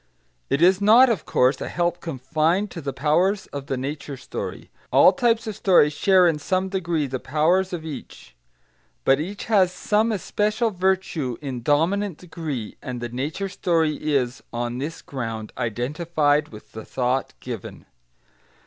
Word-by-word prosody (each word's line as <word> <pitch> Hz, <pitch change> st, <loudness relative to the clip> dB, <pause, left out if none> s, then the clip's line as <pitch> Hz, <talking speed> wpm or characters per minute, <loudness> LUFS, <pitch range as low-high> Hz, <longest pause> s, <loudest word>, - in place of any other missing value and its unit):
It 140 Hz, -, +2 dB
is 185 Hz, +2 st, +5 dB
not, 235 Hz, +5 st, +7 dB
of 200 Hz, -9 st, -3 dB
course, 125 Hz, +2 st, +2 dB
a -, -, -3 dB
help 175 Hz, 0 st, -1 dB
confined 160 Hz, +7 st, 0 dB
to 170 Hz, -, -7 dB
the 140 Hz, -2 st, -3 dB
powers 170 Hz, +9 st, +1 dB
of 140 Hz, -1 st, -6 dB
the 135 Hz, -, -2 dB
nature 140 Hz, +1 st, -5 dB
story; 130 Hz, -, -7 dB, 0.2 s
all -, -, +7 dB
types 235 Hz, -4 st, +1 dB
of 215 Hz, -2 st, -4 dB
story 175 Hz, -7 st, +4 dB
share 185 Hz, +4 st, +4 dB
in 160 Hz, -3 st, +1 dB
some 185 Hz, +4 st, -1 dB
degree 175 Hz, -5 st, -1 dB
the 130 Hz, -1 st, -4 dB
powers 165 Hz, +8 st, +1 dB
of 170 Hz, -3 st, -5 dB
each. 155 Hz, -3 st, -9 dB, 0.7 s
But 135 Hz, +1 st, +4 dB
each 195 Hz, +7 st, -5 dB
has 195 Hz, -5 st, +3 dB
some 215 Hz, +4 st, +1 dB
especial 215 Hz, +2 st, 0 dB
virtue 180 Hz, -, -1 dB
in 135 Hz, -5 st, -5 dB
dominant 165 Hz, -, +1 dB
degree, 155 Hz, -10 st, -6 dB
and 125 Hz, -2 st, -5 dB
the 120 Hz, 0 st, -4 dB
nature 145 Hz, +11 st, -3 dB
story 165 Hz, -4 st, +1 dB, 0.2 s
is, 125 Hz, -1 st, 0 dB
on 120 Hz, +1 st, -3 dB
this 155 Hz, +4 st, -5 dB
ground, 115 Hz, -5 st, -5 dB
identified 145 Hz, +5 st, 0 dB
with 105 Hz, -1 st, -13 dB
the 110 Hz, -, -8 dB
thought 130 Hz, +1 st, -1 dB
given. 120 Hz, -5 st, -8 dB
155 Hz, 160 wpm, -23 LUFS, 135-190 Hz, 0.7 s, not